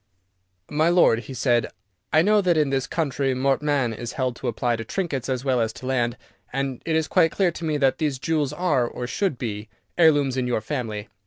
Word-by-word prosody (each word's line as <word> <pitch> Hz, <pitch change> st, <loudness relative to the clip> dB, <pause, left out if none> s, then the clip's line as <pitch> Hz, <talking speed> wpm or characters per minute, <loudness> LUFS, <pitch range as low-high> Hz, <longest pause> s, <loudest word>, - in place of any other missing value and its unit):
"My 155 Hz, +3 st, +2 dB
lord," 175 Hz, -10 st, +4 dB
he 130 Hz, +2 st, -9 dB
said, 120 Hz, -3 st, +2 dB, 0.4 s
"I 155 Hz, +1 st, +5 dB
know 210 Hz, +2 st, +4 dB
that 175 Hz, -4 st, +2 dB
in 150 Hz, -3 st, +2 dB
this 135 Hz, 0 st, 0 dB
country 140 Hz, -4 st, -1 dB
mortmain 135 Hz, -1 st, +1 dB
is 120 Hz, +2 st, -6 dB
held 130 Hz, -2 st, -1 dB
to 130 Hz, -, -5 dB
apply 120 Hz, 0 st, 0 dB
to 115 Hz, -, -5 dB
trinkets 140 Hz, -, -3 dB
as 130 Hz, 0 st, -2 dB
well 130 Hz, -3 st, +2 dB
as 110 Hz, -1 st, 0 dB
to -, -, -10 dB
land, 120 Hz, -2 st, 0 dB, 0.3 s
and 135 Hz, -1 st, -3 dB
it 160 Hz, -, +1 dB
is 160 Hz, -1 st, +1 dB
quite 170 Hz, -3 st, +4 dB
clear 185 Hz, +1 st, +1 dB
to 170 Hz, -, -9 dB
me 155 Hz, -2 st, 0 dB
that 135 Hz, 0 st, +2 dB
these 150 Hz, -4 st, 0 dB
jewels 150 Hz, 0 st, 0 dB
are, 150 Hz, -7 st, +1 dB
or 125 Hz, -, -5 dB
should 145 Hz, -, -1 dB
be, 110 Hz, -3 st, -5 dB, 0.3 s
heirlooms 145 Hz, -5 st, +4 dB
in 125 Hz, -1 st, 0 dB
your 120 Hz, -, 0 dB
family. 110 Hz, -4 st, -4 dB
135 Hz, 215 wpm, -24 LUFS, 120-155 Hz, 0.4 s, I